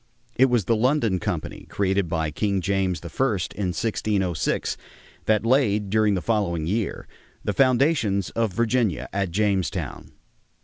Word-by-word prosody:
It 130 - +6
was 120 -7 +1
the 115 - +2
London 115 -5 +2
Company, - - -4
created 95 -2 0
by 80 -2 -1
King 100 +4 0
James 95 -2 0
I, - - -11 0.5
in 100 -2 -2
1606, 95 -3 -1 0.5
that 110 0 +2
laid 105 -6 +2
during 105 -1 +3
the 90 - -3
following 90 -8 0
year 105 +5 -2 0.4
the - - -1
foundations 125 - +2
of 115 +1 0
Virginia 115 - 0
at 95 -1 0
Jamestown. 100 0 -1
100 Hz, 135 wpm, -24 LUFS, 95-115 Hz, 0.5 s, It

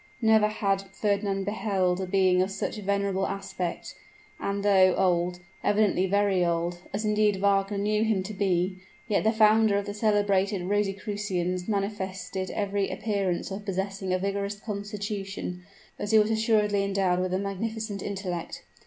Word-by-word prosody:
Never 220 -2 +4
had 200 -2 0
Fernand 200 -2 0
beheld 190 -3 0
a 190 - -3
being 185 -1 +3
of 185 - +1
such 200 +2 -3
venerable 200 -1 0
aspect; 190 -3 -4 0.5
and, 200 0 -2
though 190 -2 +5
old 180 -1 +1 0.2
evidently 205 -3 +2
very 200 -1 +2
old, 170 0 -1
as 215 +2 -2
indeed 210 -1 +3
Wagner 195 +1 +1
knew 210 +2 +1
him 215 -4 +1
to 210 +3 -6
be 185 -2 0 0.3
yet 210 -3 +1
the 220 - +4
founder 220 -1 +4
of 200 - -2
the 205 - -4
celebrated 205 -3 +1
Rosicrucians 195 -2 -1
manifested 190 -2 -3
every 200 -1 -1
appearance 200 -4 -2
of 195 +2 -5
possessing 195 -1 -3
a 185 - +3
vigorous 200 +1 -2
constitution, 200 -3 -5 0.4
as 205 - -3
he 220 - +5
was 215 +1 +4
assuredly 215 -2 +2
endowed 195 -2 +1
with 185 0 -1
a 185 - +1
magnificent 205 +1 -3
intellect. 185 -4 -4
200 Hz, 150 wpm, -27 LUFS, 190-210 Hz, 0.5 s, though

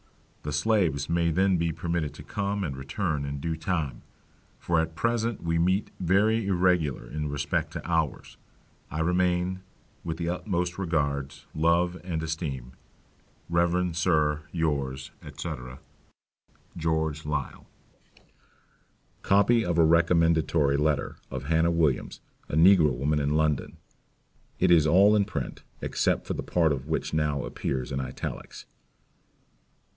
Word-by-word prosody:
The 75 - -4
slaves 75 -3 +1
may 85 0 +1
then 95 +3 +2
be 85 0 0
permitted 80 -3 -2
to 75 - -10
come 100 +5 -2
and 70 -6 -3
return 75 +3 -2
in 70 0 -4
due 80 +3 -2
time, 80 -3 -2 0.6
for 85 -1 0
at 80 0 -2
present 115 -2 -1
we 85 0 0
meet 95 +4 +1
very 105 +4 +2
irregular 90 -6 +1
in 75 -1 -4
respect 70 0 -1
to - - -6
hours. 80 -5 -1 0.5
I 75 +2 -3
remain, 90 +2 +1 0.4
with 80 -1 -4
the 85 0 -2
utmost 90 0 -2
regards, 70 -6 -2
love 85 +3 +1
and 85 -3 -3
esteem, 75 -6 -4 0.8
Rev. 85 0 +1
Sir, 75 -4 +2
yours, 70 -5 -2 0.3
&c. - - -4 1.3
George 80 -2 -1
Liele. 75 -2 -4 1.6
Copy 110 +4 +4
of 85 -4 -1
a 85 - +6
Recommendatory 80 -3 +3
Letter 75 0 0
of 65 0 -5
Hannah 80 +3 +2
Williams, 80 -6 0 0.3
a - - -2
Negro 80 -2 +6
Woman, 75 +4 0
in 70 +1 0
London. 75 -3 0 0.8
It 95 -1 +3
is 80 -3 +6
all 100 +6 +6
in 100 -1 +3
print, 70 - -5 0.2
except - - 0
the - - -2
part 85 -3 +2
of 70 -2 -2
it - - -13
which 80 - -2
now 75 -3 0
appears 65 -2 -3
in 70 - -2
Italics. 65 -1 -6
80 Hz, 135 wpm, -27 LUFS, 75-90 Hz, 1.6 s, a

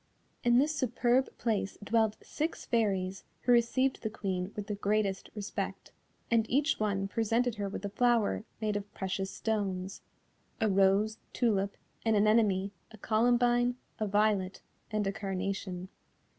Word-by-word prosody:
In 240 0 +5
this 300 +4 +3
superb 255 0 +2
place 215 -4 -1
dwelt 220 0 +2
six 310 +2 -3
Fairies 195 -5 0 0.2
who 250 - +2
received 250 +3 +3
the 220 - -2
Queen 190 -3 -3
with 210 - -4
the 210 - -3
greatest 200 -1 0
respect, 205 -1 -4 0.4
and 230 -1 +3
each 285 +5 +2
one 200 -2 0
presented 230 +2 0
her 200 -1 -2
with 195 - -5
a - - -2
flower 230 0 +2 0.2
made 215 -1 -1
of 205 0 -4
precious 190 0 -2
stones 195 -4 -2 0.6
a 220 - +2
rose, 195 +2 +3
tulip, 200 -5 +1 0.3
an 225 -1 +3
anemone, 205 -2 +3 0.2
a 220 - -13
columbine, 240 +3 +3 0.2
a 215 - 0
violet, 200 -2 +1 0.3
and 215 -2 0
a 195 - +1
carnation. 195 -2 -3
215 Hz, 145 wpm, -31 LUFS, 195-235 Hz, 0.6 s, In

